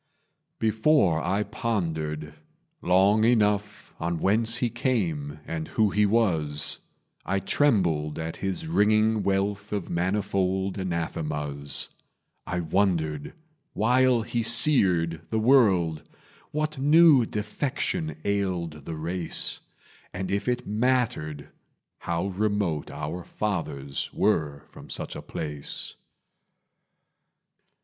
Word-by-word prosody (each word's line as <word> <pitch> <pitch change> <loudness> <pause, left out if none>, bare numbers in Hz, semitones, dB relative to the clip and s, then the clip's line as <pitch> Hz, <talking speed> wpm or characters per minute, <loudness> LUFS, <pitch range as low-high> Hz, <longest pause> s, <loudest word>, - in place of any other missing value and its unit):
Before 110 - +3
I 100 +2 +1
pondered 80 -10 -3 0.5
long 95 +4 +4
enough 105 -3 +1
On 85 +1 -1
whence 110 +6 +2
he 120 - +1
came 85 - -1
and 80 -1 -4
who 110 -3 +1
he 105 +1 +3
was, 80 -10 +1 0.4
I 95 - -1
trembled 90 - +1
at 80 0 -4
his 95 - -3
ringing 110 -6 +3
wealth 100 +1 -1
Of 100 -4 -3
manifold 95 +1 0
anathemas; 75 -5 -3 0.6
I 90 0 -1
wondered, 80 -4 0 0.4
while 125 +2 +3
he 120 +1 -2
seared 95 - +4
the 110 - -1
world, 100 - +4 0.5
What 155 -1 -2
new 150 -1 +6
defection 140 - -2
ailed 90 -7 -2
the 80 - -5
race, 85 +2 -3 0.5
And 95 +1 -4
if 100 +3 -1
it 125 0 -1
mattered 110 - 0 0.5
how 85 +3 -2
remote 100 -5 -1
Our 85 +5 -5
fathers 75 -11 -3
were 75 -9 0
from - - -14
such - - -3
a - - -6
place. 75 -2 -5
95 Hz, 105 wpm, -26 LUFS, 80-110 Hz, 0.6 s, new